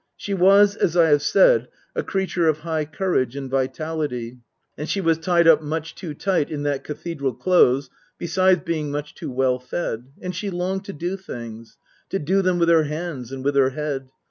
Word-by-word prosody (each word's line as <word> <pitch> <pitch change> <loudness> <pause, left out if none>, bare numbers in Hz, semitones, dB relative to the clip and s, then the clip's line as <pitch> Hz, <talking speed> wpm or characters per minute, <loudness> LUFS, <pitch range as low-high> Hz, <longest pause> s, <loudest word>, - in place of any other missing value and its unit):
She 200 - -4
was, 200 +2 +5
as 175 -5 0
I 165 -2 +5
have 145 -1 +4
said, - - +4 0.3
a - - 0
creature 185 -4 -1
of 155 -1 +1
high 160 -2 -2
courage 155 - -1
and 135 -2 -6
vitality 135 -3 -2 0.4
and 150 - -6
she 200 - 0
was 165 -3 +2
tied 170 0 +3
up 160 -2 +7
much 160 +1 -4
too 165 -5 -7
tight 185 -3 0
in 145 -2 -4
that 145 -2 -1
Cathe 165 +1 -6
dral 135 -4 -2
Close, 140 -7 +3 0.3
besides 185 +1 +2
being 155 -3 -2
much 145 +1 -4
too - - -7
well 130 0 +1
fed; 125 -3 -4
and 180 -1 -5
she 200 +3 -3
longed 190 +2 -2
to 200 - -6
do 175 +4 -3
things. 115 - -9 0.3
To - - -1
do 190 +4 +1
them 185 -1 +1
with 170 -1 +2
her 165 -2 +5
hands 150 -5 -5
and 135 0 -6
with 145 - +2
her 135 -1 +4
head. 135 -1 -4
160 Hz, 200 wpm, -23 LUFS, 140-180 Hz, 0.4 s, up